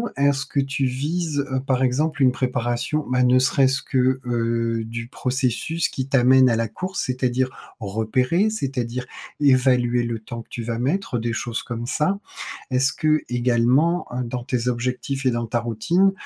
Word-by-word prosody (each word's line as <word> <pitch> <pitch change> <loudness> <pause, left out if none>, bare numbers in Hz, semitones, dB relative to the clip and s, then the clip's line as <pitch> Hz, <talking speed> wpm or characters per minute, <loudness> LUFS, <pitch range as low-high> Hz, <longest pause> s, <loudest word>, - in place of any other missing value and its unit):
est-ce 140 0 +2
que 140 - -2
tu 135 0 -1
vises, 145 +3 -1
heu, 130 - +1
par 130 -1 0
exemple, 140 +3 +1
une 130 - +6
préparation 125 +4 -1
ma 125 0 +2
ne 125 +1 +5
serait-ce 135 +1 +3
que, 130 0 +1
heu 115 -1 0
du 115 +1 -6
processus 135 +5 -1
qui 130 0 -4
t'amène 130 -1 +5
à 115 - +2
la 115 0 0
course? 185 - -4
C'est-à-dire 130 0 0 0.3
repérer, 125 - +1
c'est-à-dire 125 - -3 0.4
évaluer 125 -3 +3
le 115 -1 -3
temps 115 +2 -7
que - - -16
tu 120 - -5
vas 115 0 -3
mettre, 135 0 -1
des 115 0 -2
choses 115 +1 -3
comme 120 0 -5
ça? 150 +10 0 0.5
Est-ce 135 +1 +2
que, 155 0 +2
également, 125 +7 +2
heu, 125 +1 -2
dans 120 0 -4
tes 125 -2 -1
objectifs 125 +3 -2
et 130 - +4
dans 120 0 -1
ta 120 +2 0
routine, 120 - +2
125 Hz, 170 wpm, -23 LUFS, 120-135 Hz, 0.5 s, une